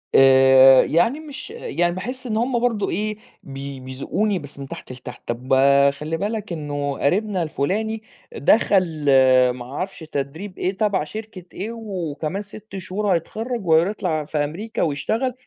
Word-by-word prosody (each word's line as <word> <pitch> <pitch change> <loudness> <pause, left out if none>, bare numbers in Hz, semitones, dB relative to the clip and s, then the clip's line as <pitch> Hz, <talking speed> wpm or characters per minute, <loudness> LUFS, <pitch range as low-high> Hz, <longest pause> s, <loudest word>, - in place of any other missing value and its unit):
آآ 130 0 +8
يعني 230 - +2
مش 295 +2 -9
يعني 315 - -1
باحِس 250 +6 -5
إن 215 -1 -1
هُم 240 +1 +1
برضه 230 -4 0
إيه، 215 0 -2 0.3
بي 135 0 -7
بيذوقوني 155 +10 -2
بس 145 -1 -12
من 135 - -6
تحت - - -9
لتحت، 125 0 -10
طَب 125 +3 -2 0.4
خلِّ 155 +3 -4
بالك 210 -1 -3
إنه 145 -2 -3
قريبنا 190 +3 +1
الفلاني 215 +9 -2 0.3
دخل 205 - +4 0.7
ما 125 -1 -7
أعرفش 180 +10 -5
تدريب 160 +5 -5
إيه 190 +2 -2
تبع 205 -6 +1
شركة 215 +1 -8
إيه 215 +5 -5
و 200 -8 -5
وكمان 160 +7 -3
6 210 -1 -10
شهور 205 +3 -3
هيتخرج 220 +6 -3
وهير 165 +2 +4
يطلع 180 -7 -2
في 150 - -4
أمريكا 165 +10 -3
ويشتغل، 220 - 0
185 Hz, 150 wpm, -22 LUFS, 145-215 Hz, 0.7 s, آآ